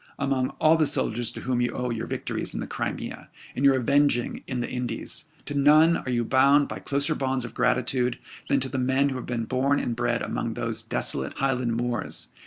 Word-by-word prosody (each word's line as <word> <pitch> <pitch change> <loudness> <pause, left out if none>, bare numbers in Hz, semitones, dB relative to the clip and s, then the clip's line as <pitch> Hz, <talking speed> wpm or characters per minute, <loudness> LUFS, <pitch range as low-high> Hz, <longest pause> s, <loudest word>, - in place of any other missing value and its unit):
Among 135 -2 0
all 160 +1 +5
the 155 -2 +3
soldiers 120 -4 +1
to - - -7
whom 125 -1 0
you 120 - 0
owe 125 -1 -2
your 115 -1 -3
victories - - -3
in - - -3
the - - -3
Crimea, - - -5 0.3
and 130 - -2
your 140 -1 +6
avenging 135 -1 +1
in 130 -2 -3
the 120 - -2
Indies, 125 +4 -3 0.2
to 145 - -4
none 155 +4 +5
are - - -6
you 120 -2 0
bound 140 +3 +4
by - - -6
closer 140 +2 +1
bonds 130 -3 -1
of 120 - -8
gratitude 125 0 +1 0.3
than 140 - +3
to 130 - -2
the 130 - -2
men 130 +2 +2
who 135 - -4
have 130 - -7
been 115 -2 -2
born 135 +4 +1
and 120 - -2
bred 120 +1 0
among - - -3
those - - -3
desolate 65 +1 -2
Highland 125 -4 0
moors. 120 0 -2
130 Hz, 210 wpm, -26 LUFS, 120-140 Hz, 0.3 s, your